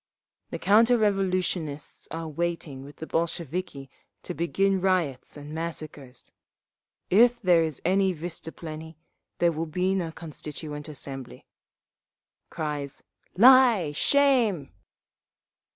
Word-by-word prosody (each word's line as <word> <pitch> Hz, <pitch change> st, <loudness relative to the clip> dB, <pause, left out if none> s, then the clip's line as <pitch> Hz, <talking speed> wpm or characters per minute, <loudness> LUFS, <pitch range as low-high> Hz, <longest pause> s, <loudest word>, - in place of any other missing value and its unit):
"The -, -, -4 dB
counter 230 Hz, +4 st, +5 dB
revolutionists 185 Hz, -7 st, -1 dB
are 165 Hz, +1 st, -5 dB
waiting 160 Hz, -4 st, -3 dB
with 145 Hz, +1 st, -12 dB
the 160 Hz, -, -7 dB
Bolsheviki 165 Hz, -3 st, -3 dB, 0.4 s
to -, -, -5 dB
begin 190 Hz, +4 st, +1 dB
riots 175 Hz, -9 st, 0 dB
and 145 Hz, +1 st, -9 dB
massacres…. 155 Hz, -6 st, -5 dB, 0.8 s
If 235 Hz, +5 st, +5 dB
there 180 Hz, -6 st, +4 dB
is 160 Hz, -4 st, -2 dB
any 190 Hz, +1 st, +3 dB
vystuplennie, 160 Hz, -1 st, -7 dB, 0.4 s
there 170 Hz, -1 st, +3 dB
will 165 Hz, +1 st, -3 dB
be 180 Hz, +4 st, 0 dB
no 175 Hz, -4 st, -1 dB
Constituent 150 Hz, -2 st, -7 dB
Assembly…." 135 Hz, -3 st, -8 dB, 1.0 s
(Cries, 150 Hz, -3 st, -4 dB, 0.3 s
"Lie! 240 Hz, -, +7 dB
Shame!") 235 Hz, -, +2 dB
165 Hz, 105 wpm, -26 LUFS, 150-190 Hz, 1.0 s, Lie